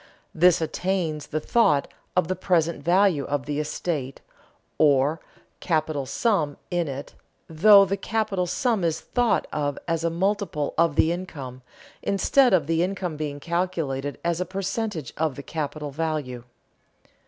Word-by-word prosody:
This 175 +1 +4
attains 165 -2 -2
the 155 - -2
thought 150 -5 +2 0.3
of 180 - +3
the 185 - -1
present 170 -3 0
value 180 -4 +3
of 145 -3 -2
the 145 0 -2
estate, 150 -3 -3 0.6
or 145 +1 +3 0.4
capital 155 -5 -1
sum 155 - 0
in 175 -2 0
it, 140 0 -6 0.3
though 200 +5 +7
the 195 +1 -2
capital 200 -3 -1
sum 225 0 0
is 165 -2 0
thought 245 -2 +1
of 145 -2 -1
as 165 -1 -1
a 170 - +2
multiple 190 -3 -1
of 165 -3 +2
the 160 - +3
income, 140 -8 -6 0.4
instead 250 +6 +3
of 180 -6 +3
the 165 +1 +1
income 180 -2 -2
being 145 -1 -4
calculated 160 -4 -2
as 170 0 0
a - - +2
percentage 195 - -3
of 155 -3 0
the 140 - -8
capital 150 -2 -4
value. 145 -5 -3
165 Hz, 145 wpm, -25 LUFS, 145-185 Hz, 0.6 s, though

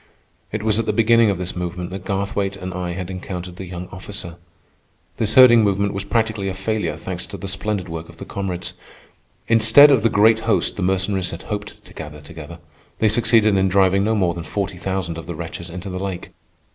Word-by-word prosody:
It 110 0 -3
was 110 0 +2
at 115 - -2
the - - +1
beginning 115 0 +4
of 100 - 0
this 90 0 -4
movement 90 0 -4
that 95 0 -6
Garthwaite 100 0 -2
and 95 -1 -6
I 90 -1 -3
had 90 +1 -5
encountered 90 -1 -6
the 95 - -7
young 90 0 -7
officer. 95 -2 -7 0.8
This 110 -1 0
herding 120 -3 +8
movement 100 0 +1
was 100 0 -4
practically 110 -2 0
a 95 - -4
failure, 100 -4 -2
thanks 90 +2 -6
to 100 - -8
the 100 - -6
splendid 95 0 -2
work 80 -1 -7
of 85 - -14
the - - -8
comrades. 95 -3 -4 0.7
Instead 115 +6 +7
of 130 -5 +4
the 115 - +3
great 110 +2 +4
host 110 0 0
the - - -5
Mercenaries 95 0 0
had 85 - -8
hoped 105 0 -6
to - - -15
gather 75 -1 -8
together, 80 +3 -10 0.4
they 110 - +3
succeeded 110 -1 +3
in 95 0 +2
driving 95 +1 +3
no 110 +2 +1
more 90 -5 +1
than 85 -1 -6
forty 100 +1 -3
thousand 95 -3 -3
of 80 - -10
the 85 - -5
wretches 85 +1 -7
into 90 +3 -7
the 90 - -4
lake. 95 -2 -5
95 Hz, 210 wpm, -21 LUFS, 90-105 Hz, 0.8 s, herding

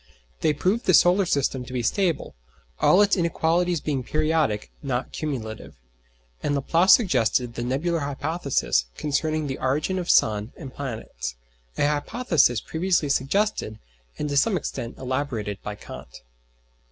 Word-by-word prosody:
They 155 - +2
proved 185 - 0
the 185 - +6
solar 180 +2 +5
system 135 -4 0
to 125 - -10
be 125 -2 -1
stable; 175 - 0 0.5
all 195 +3 +5
its 205 - +3
inequalities 170 -1 +1
being 140 -4 -1
periodic, 155 -6 0
not 130 -3 -2
cumulative. 120 -8 -5 0.7
And 145 - 0
Laplace 165 +7 +4
suggested 125 - +2
the 120 - -5
"nebular 145 +8 -1
hypothesis" 140 - 0
concerning 155 +1 -1
the 135 -2 -4
origin 150 +8 0
of 175 - -5
sun 105 +1 +3
and 130 -1 -9
planets: 110 - -5 0.4
a - - +2
hypothesis 150 - +1
previously 170 -2 0
suggested, 140 - 0 0.4
and 150 - -2
to 140 - 0
some 190 +7 +3
extent, 115 -7 -5
elaborated, 125 -6 -3
by 105 - -5
Kant. 80 - -11
145 Hz, 140 wpm, -24 LUFS, 125-170 Hz, 0.7 s, the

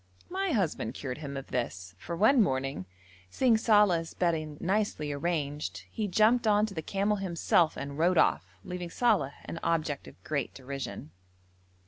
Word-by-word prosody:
My 385 +1 -1
husband 195 - -1
cured 130 -1 -5
him 140 -2 -5
of 135 - -8
this, 95 -7 -3
for 170 - -5
one 230 +8 +5
morning, 135 - -1 0.4
seeing 240 - +3
Saleh's 205 -7 +3
bedding 155 -4 -1
nicely 190 -6 0
arranged, 150 -1 -2
he 215 -2 -2
jumped 220 +5 +3
on 210 0 +4
to 215 - -7
the 160 - -3
camel 200 +5 0
himself 170 -3 +2
and 140 +1 -5
rode 175 +2 +3
off, - - +2
leaving 180 -1 -5
Saleh 200 - +2
an 165 - -6
object 155 -4 -1
of - - -12
great 145 -5 -2
derision. 135 - -6
170 Hz, 155 wpm, -29 LUFS, 140-205 Hz, 0.4 s, one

